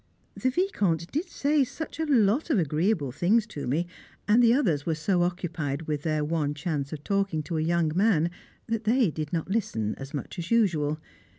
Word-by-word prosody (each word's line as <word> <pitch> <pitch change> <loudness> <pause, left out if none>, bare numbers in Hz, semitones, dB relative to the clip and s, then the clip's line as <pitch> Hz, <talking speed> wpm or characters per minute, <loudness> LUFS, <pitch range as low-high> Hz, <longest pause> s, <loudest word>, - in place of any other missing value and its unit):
The 260 - 0
Vicomte 200 - 0
did 310 +7 -2
say 285 0 +2
such 315 +6 -6
a 320 - 0
lot 245 +2 +3
of 285 - +3
agreeable 160 - +1
things 200 - +2
to 150 - -6
me, 155 +7 +1 0.4
and 220 +4 +5
the 235 -1 +6
others 185 - +2
were 165 0 0
so 175 +3 +1
occupied 165 -5 -2
with 150 -2 -2
their 155 -1 0
one 150 -2 -1
chance 145 -3 -3
of 150 -1 -6
talking 195 -5 0
to 160 +2 -3
a - - +1
young 165 -1 +1
man 180 -5 +3 0.3
that 225 -1 -2
they 230 -4 +3
did 155 -1 -5
not 170 +2 -2
listen 115 - -1
as 135 0 -7
much 145 +4 -5
as 170 +1 -5
usual. 160 -10 +2
170 Hz, 195 wpm, -27 LUFS, 155-225 Hz, 0.4 s, the